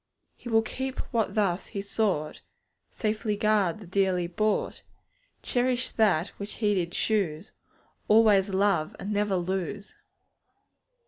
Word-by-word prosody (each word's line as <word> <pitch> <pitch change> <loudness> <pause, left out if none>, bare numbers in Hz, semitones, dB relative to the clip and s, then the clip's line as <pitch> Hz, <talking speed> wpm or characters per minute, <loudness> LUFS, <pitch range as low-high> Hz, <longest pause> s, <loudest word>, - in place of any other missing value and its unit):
He 240 - -9
will 225 -1 +4
keep 265 +4 -4 0.2
what 230 -1 0
thus 195 -4 0
He 200 - -5
sought, 200 -7 -1 0.5
Safely 215 -1 -1
guard 210 -4 +1
the 210 - -11
dearly 185 -1 +1
bought; 210 +5 -1 0.6
Cherish 250 0 0
that 195 -7 +2
which 200 +1 -6
He 210 -2 +1
did 175 -3 -1
choose, 180 -9 -1 0.6
Always 210 -2 +5
love 190 -5 +1
and 205 +2 -4
never 205 -1 +1
lose. 190 +3 -3
205 Hz, 125 wpm, -27 LUFS, 185-220 Hz, 0.6 s, Always